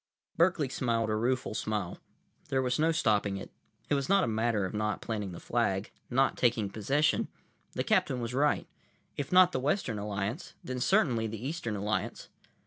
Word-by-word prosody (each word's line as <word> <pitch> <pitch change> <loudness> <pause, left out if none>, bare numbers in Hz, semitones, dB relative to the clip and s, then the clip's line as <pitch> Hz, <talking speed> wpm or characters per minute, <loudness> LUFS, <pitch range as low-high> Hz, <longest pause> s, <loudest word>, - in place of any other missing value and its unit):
Berkeley 170 -4 +3
smiled 115 -4 0
a - - +1
rueful 125 +2 0
smile. 105 -4 -2 0.5
There 130 -1 +1
was 125 +1 0
no 160 +2 +4
stopping 105 -10 +1
it. 95 - -8 0.4
It - - 0
was 140 +1 0
not 195 -1 +5
a - - +1
matter 110 -2 +1
of 95 - -5
not 105 0 -1
planting 105 -4 -3
the 85 - -8
flag, 105 -4 0 0.2
not 135 +2 +2
taking 115 -5 +2
possession. 135 +9 +1 0.5
The - - -1
captain 125 - +2
was 120 0 -3
right. 145 +3 +2 0.5
If 145 - -4
not 180 0 +7
the 130 - -1
Western 130 - 0
Alliance, 105 - -4
then 130 -6 -4
certainly 125 - +2
the 110 +3 -5
Eastern 140 -9 -3
Alliance. 105 +2 -2
120 Hz, 175 wpm, -30 LUFS, 105-140 Hz, 0.5 s, not